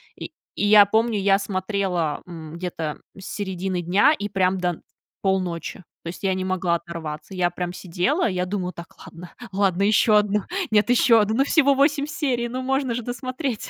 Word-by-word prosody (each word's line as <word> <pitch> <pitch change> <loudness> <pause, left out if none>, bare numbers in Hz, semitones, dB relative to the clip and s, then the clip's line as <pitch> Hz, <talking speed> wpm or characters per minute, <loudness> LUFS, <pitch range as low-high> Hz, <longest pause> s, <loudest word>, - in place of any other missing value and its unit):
и, - - -7 0.3
и 205 - 0
я 205 -1 +8
помню, 220 +1 +1
я 195 0 +3
смотрела, 185 -5 -2
м, 160 -3 -9
где-то 165 -3 -5 0.2
с 190 - -10
середины 190 -2 -3
дня 195 - +4
и 205 0 -4
прям 190 -1 +1
до 180 0 0
н 170 - -6 0.4
полночи, 185 -3 -2 0.2
то - - -8
есть 180 - -9
я 190 -1 +2
не 185 0 -3
могла 185 -2 0
оторваться. 170 0 -7
Я 175 -1 +1
прям 175 +1 -5
сидела, 185 - 0
я 180 -1 -1
думаю: 185 -1 -3
"Так, 170 0 -11
ладно, 175 +1 -12 0.2
ладно, 195 -1 +1
еще 210 +1 +4
одну. 210 -1 +1 0.3
Нет, 215 +2 +3
еще 240 -2 +5
одну, 215 +2 0
ну, 275 - +4
всего 280 -4 +4
8 285 +1 +2
серий, 255 -7 -1
ну, 255 +2 -4
можно 265 -1 0
же 245 - -4
досмотреть". 255 0 -4
195 Hz, 190 wpm, -23 LUFS, 180-230 Hz, 0.4 s, я